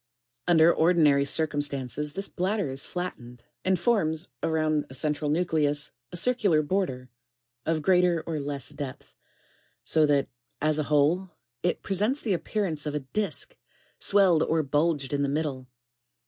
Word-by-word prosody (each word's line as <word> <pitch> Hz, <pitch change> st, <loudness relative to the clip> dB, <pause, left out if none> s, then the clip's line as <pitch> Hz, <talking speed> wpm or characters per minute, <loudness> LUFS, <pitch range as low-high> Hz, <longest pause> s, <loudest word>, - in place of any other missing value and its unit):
[ 120 Hz, +1 st, -51 dB
Under 170 Hz, -1 st, +6 dB
ordinary 155 Hz, -5 st, +4 dB
circumstances, 145 Hz, -1 st, -1 dB
this 195 Hz, +4 st, -2 dB
bladder 190 Hz, -4 st, -1 dB
is 135 Hz, +1 st, -3 dB
flattened, 125 Hz, -10 st, -6 dB, 0.2 s
and 190 Hz, 0 st, +2 dB
forms, 175 Hz, -6 st, +1 dB
around 155 Hz, -2 st, 0 dB
a 130 Hz, -, -6 dB
central 150 Hz, +1 st, -1 dB
nucleus, 150 Hz, -3 st, +1 dB, 0.2 s
a 175 Hz, -, -3 dB
circular 200 Hz, -8 st, +2 dB
border, 145 Hz, -8 st, -2 dB, 0.6 s
of 160 Hz, -1 st, 0 dB
greater 180 Hz, -2 st, +3 dB
or 160 Hz, -2 st, -3 dB
less 140 Hz, -2 st, -3 dB
depth, 145 Hz, -3 st, -8 dB, 0.7 s
so 155 Hz, -1 st, +3 dB
that, 140 Hz, -1 st, +2 dB, 0.3 s
as 155 Hz, 0 st, +1 dB
a -, -, +1 dB
whole, 155 Hz, +6 st, +2 dB, 0.3 s
it 175 Hz, -, -1 dB
presents 210 Hz, +8 st, 0 dB
the 215 Hz, -8 st, -1 dB
appearance 170 Hz, -5 st, -2 dB
of 150 Hz, -, -3 dB
a 150 Hz, -, -1 dB
disk, 210 Hz, -, -3 dB, 0.5 s
(a.) -, -, -9 dB
swelled 190 Hz, -5 st, +4 dB
or 160 Hz, -1 st, +1 dB
bulged 145 Hz, -1 st, 0 dB
in 140 Hz, -, 0 dB
the 140 Hz, -, +1 dB
middle. 140 Hz, -3 st, -2 dB
155 Hz, 150 wpm, -27 LUFS, 145-180 Hz, 0.7 s, Under